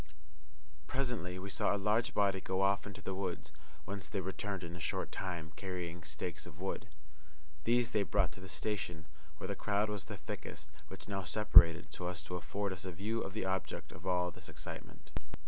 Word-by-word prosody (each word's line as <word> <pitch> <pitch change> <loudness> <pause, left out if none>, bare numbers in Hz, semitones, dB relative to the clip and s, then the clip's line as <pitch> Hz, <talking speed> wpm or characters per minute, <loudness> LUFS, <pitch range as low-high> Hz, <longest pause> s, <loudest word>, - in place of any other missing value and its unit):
Presently 120 -9 0
we 95 +2 -4
saw - - +3
a - - +1
large 110 +3 +2
body 100 -2 +4
go 95 +1 +1
off 100 +1 +3
into 100 - -8
the 95 - -2
hills, 95 -5 -2 0.3
whence 100 0 -4
they 100 - 0
returned 95 0 -2
in 85 0 -5
a - - -6
short 80 - -1
time, 85 -4 -3
carrying 90 -3 -3
stakes 80 +2 -4
of - - -11
wood. - - -2 0.8
These 120 0 +4
they 105 - +4
brought - - +3
to - - -9
the 95 0 -8
station 85 -1 -2 0.3
where - - -4
the 100 - -1
crowd 105 +1 +2
was 105 -3 -3
the - - -5
thickest, 75 - -6 0.2
which 95 - -8
now 95 -1 -1
separated 85 -3 +7
so 90 - -3
as 90 -4 -3
to 90 +3 -4
afford 100 +2 -1
us 95 - -6
a 95 - -3
view 105 +6 -1
of 95 - -3
the 110 -3 -1
object 95 0 -1
of - - -8
all 90 -1 +3
this - - -9
excitement. - - -8
95 Hz, 200 wpm, -36 LUFS, 90-100 Hz, 0.8 s, separated